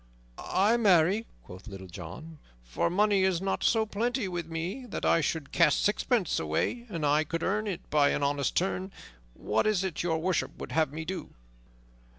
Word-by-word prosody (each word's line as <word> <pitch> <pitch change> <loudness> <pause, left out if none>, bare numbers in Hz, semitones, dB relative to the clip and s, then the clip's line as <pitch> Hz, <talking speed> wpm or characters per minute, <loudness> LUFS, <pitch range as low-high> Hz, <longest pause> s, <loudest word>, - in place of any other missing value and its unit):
"Ay, 210 +5 +2
marry," 195 0 +3 0.2
quoth 95 +5 -12
Little 95 -3 -8
John, 95 - -9 0.2
"for - - -1
money 200 +2 +3
is 190 -3 +2
not 195 +1 -2
so 220 -1 +3
plenty 230 +2 -1
with 175 -3 -4
me 170 +10 -4
that - - -4
I 165 - +4
should 155 -1 -2
cast 165 -4 +3
sixpence 210 - +1
away 80 - -1
an 165 -6 -4
I 150 +1 +3
could 165 +2 -4
earn 210 +3 0
it 190 -4 -5
by 145 -1 +4
an 145 - 0
honest 140 -1 0
turn. 190 +1 -1 0.4
What 110 - 0
is 205 -3 +2
it 190 -5 -2
Your 165 -2 0
Worship 175 +2 -1
would - - -7
have 160 -3 +1
me 160 +1 -6
do?" 185 +3 -6
170 Hz, 180 wpm, -29 LUFS, 150-200 Hz, 0.4 s, I